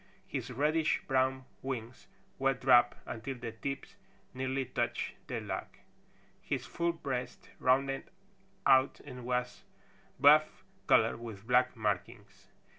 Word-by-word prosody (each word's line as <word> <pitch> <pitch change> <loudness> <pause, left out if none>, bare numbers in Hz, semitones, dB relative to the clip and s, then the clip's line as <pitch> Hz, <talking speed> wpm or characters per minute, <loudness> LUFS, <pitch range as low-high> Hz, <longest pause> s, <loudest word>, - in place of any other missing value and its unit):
His - - -4
reddish 150 +5 +1
brown 130 0 +1 0.2
wings 125 -2 -5 0.3
were 135 0 +2
dropped 125 -2 +5
until 125 +4 -5
the 120 -2 -6
tips 135 +5 -6 0.4
nearly 130 +1 -1
touched 120 -1 -2
the - - -3
log. - - -4 0.7
His - - -3
full 170 0 -1
breast 130 -6 -5
rounded 135 +1 +1 0.6
out 130 +1 +5
and 125 -1 -9
was 125 0 -2 0.6
buff 150 +3 +5 0.2
color - - +4
with 110 -4 -9
black 125 +1 +3
markings. 105 0 -4
130 Hz, 115 wpm, -32 LUFS, 120-135 Hz, 0.7 s, dropped